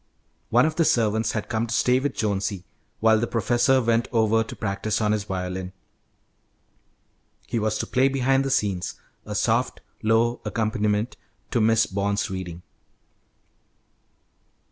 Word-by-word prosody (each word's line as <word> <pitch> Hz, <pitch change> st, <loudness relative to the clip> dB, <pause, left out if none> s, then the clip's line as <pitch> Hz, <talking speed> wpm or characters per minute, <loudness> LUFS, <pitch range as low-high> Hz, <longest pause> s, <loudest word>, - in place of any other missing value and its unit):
One 120 Hz, +3 st, +4 dB
of 155 Hz, 0 st, -2 dB
the 170 Hz, -, +4 dB
servants 110 Hz, -5 st, +1 dB
had 105 Hz, -, -3 dB
come 115 Hz, 0 st, -1 dB
to 115 Hz, -, -2 dB
stay 125 Hz, +1 st, +3 dB
with 145 Hz, +2 st, -2 dB
Jonesy 100 Hz, -3 st, -2 dB, 0.4 s
while 110 Hz, 0 st, +5 dB
the 120 Hz, -, -1 dB
professor 120 Hz, +4 st, +2 dB
went 115 Hz, 0 st, +2 dB
over 115 Hz, -1 st, +3 dB
to -, -, -9 dB
practise 100 Hz, +1 st, -2 dB
on 105 Hz, -1 st, +1 dB
his 105 Hz, -1 st, -1 dB
violin. 90 Hz, -1 st, -4 dB, 1.7 s
He 115 Hz, -, -2 dB
was 110 Hz, 0 st, 0 dB
to -, -, -2 dB
play 130 Hz, +1 st, +2 dB
behind 135 Hz, 0 st, +2 dB
the 135 Hz, -, -2 dB
scenes, 100 Hz, -8 st, 0 dB, 0.3 s
a -, -, -4 dB
soft, -, -, +1 dB, 0.2 s
low 115 Hz, +2 st, +2 dB
accompaniment 110 Hz, 0 st, -1 dB, 0.3 s
to 120 Hz, -, +1 dB
Miss 110 Hz, 0 st, +4 dB
Bond's 100 Hz, 0 st, -1 dB
reading. 90 Hz, -2 st, -6 dB
110 Hz, 145 wpm, -24 LUFS, 100-120 Hz, 1.7 s, while